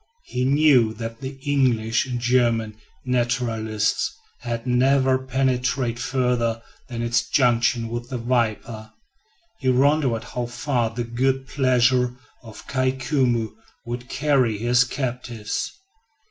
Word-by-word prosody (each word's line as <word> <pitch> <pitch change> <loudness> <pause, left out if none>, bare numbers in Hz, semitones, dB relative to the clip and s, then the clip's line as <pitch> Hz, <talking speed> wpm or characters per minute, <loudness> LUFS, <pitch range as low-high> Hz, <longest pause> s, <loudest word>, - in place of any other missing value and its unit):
He 125 0 -2
knew 135 -5 +4
that 115 0 -6
the 135 0 -6
English 125 -5 +1
and 125 -2 -3
German 120 -3 +1 0.3
naturalists 115 -4 0 0.3
had 115 -1 -4
never 130 +1 +3
penetrated 130 -2 0
further 120 -3 0 0.3
than 120 -1 -4
its 120 +1 0
junction 120 -2 +2
with 120 +1 -5
the 130 - -3
Waipa. 115 -2 -2 0.7
He 130 - 0
wondered 130 -2 +2
how 120 -1 -4
far 120 -1 -1
the 120 +2 -4
good 130 +3 -1
pleasure 125 -2 +2 0.3
of 115 -3 -12
Kai 130 -1 0
Koumou 130 -4 0 0.3
would 120 +1 -6
carry 135 -7 +1
his 120 +3 +3
captives? 120 -4 -4
125 Hz, 120 wpm, -23 LUFS, 115-130 Hz, 0.7 s, knew